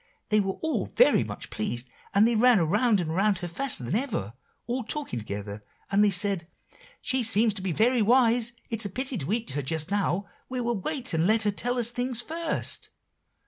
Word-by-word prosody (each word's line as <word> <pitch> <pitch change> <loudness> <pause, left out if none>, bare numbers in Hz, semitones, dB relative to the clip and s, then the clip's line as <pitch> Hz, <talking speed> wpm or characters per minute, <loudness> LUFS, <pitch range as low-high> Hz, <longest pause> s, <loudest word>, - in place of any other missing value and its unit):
they 215 - +4
were 195 -2 -1
all 320 -1 -1
very - - +4
much - - -8
pleased, 130 - -3 0.2
and 205 +3 +5
they 235 - +2
ran 240 +1 +5
around 205 +6 +2
and 165 -3 -2
around 195 +3 +2
her 175 0 -4
faster 200 - 0
than 120 - -3
ever, 215 - -2 0.3
all 245 +2 -2
talking 280 - -3
together, 100 -1 -6 0.3
and 200 +1 +4
they 210 - +5
said, 195 -3 0 0.6
'She 260 -1 +1
seems 225 -1 +3
to 195 - -8
be 185 -1 -2
very 235 +7 +3
wise, 235 +1 +4 0.2
it's 225 0 +2
a 200 - -1
pity 260 +6 -2
to 175 - -3
eat 230 -4 -1
her 145 +2 -2
just 155 +5 -3
now. 200 -1 0 0.2
We 255 0 -3
will 235 -3 -1
wait 260 - -2
and 165 +2 +2
let 220 +1 +3
her 210 - +2
tell 245 +5 -2
us 235 -1 0
things 245 -1 -2
first. 325 +6 -2
215 Hz, 205 wpm, -27 LUFS, 180-245 Hz, 0.6 s, and